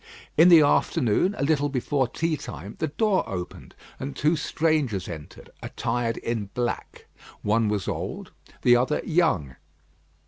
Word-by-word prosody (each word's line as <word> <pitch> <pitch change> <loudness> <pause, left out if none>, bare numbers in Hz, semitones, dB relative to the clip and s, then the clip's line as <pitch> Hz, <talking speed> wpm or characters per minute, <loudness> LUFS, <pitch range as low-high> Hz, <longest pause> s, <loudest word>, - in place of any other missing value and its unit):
In 165 +3 +7
the 170 -3 +9
afternoon, 145 - +2
a - - -1
little 145 0 +2
before 135 0 0
tea 165 +6 -1
time, 100 - -8
the 160 - 0
door 200 +5 +1
opened 90 -2 -7 0.2
and 135 +1 -5
two 155 +4 +2
strangers 150 - 0
entered, 80 -4 -10
attired 115 -1 -2
in 115 -3 -3
black. 120 -1 -3 0.4
One 105 +1 +2
was 105 -3 -2
old, - - -4 0.3
the 120 - +6
other 130 +5 +1
young. 155 - +1
130 Hz, 140 wpm, -25 LUFS, 105-155 Hz, 0.4 s, the